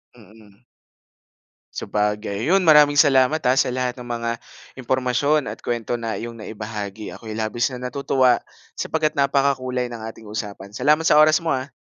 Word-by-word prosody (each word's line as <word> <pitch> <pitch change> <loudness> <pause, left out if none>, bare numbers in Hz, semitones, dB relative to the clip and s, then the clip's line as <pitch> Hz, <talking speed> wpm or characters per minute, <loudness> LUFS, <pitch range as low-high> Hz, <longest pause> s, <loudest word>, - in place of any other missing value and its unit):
Mm. 105 -1 -19 1.1
Sabagay, 105 0 -2
'yun 190 +4 +3
maraming 150 -3 +6
salamat, 145 +1 +4
ah, 130 - +3
sa 130 -2 +2
lahat 125 0 -2
ng 125 - -9
mga 115 -1 -3 0.4
impormasyon 130 +3 0
at - - -7
kuwento 120 0 -3
na 115 -1 -4
iyong 115 +3 -6
naibahagi, 105 -1 -6
ako'y 110 -2 -8
labis 115 +4 -1
na 125 0 -5
natutuwa 130 -1 +2 0.4
sapagkat 155 0 -1
napakakulay 135 -3 +1
ng 115 -2 -7
ating 110 -1 -10
usapan. 100 -2 -6
Salamat 150 +9 +2
sa 160 -2 +4
oras 155 +2 +5
mo, 165 - -3
ah. 130 -1 -2
125 Hz, 150 wpm, -22 LUFS, 110-140 Hz, 1.1 s, maraming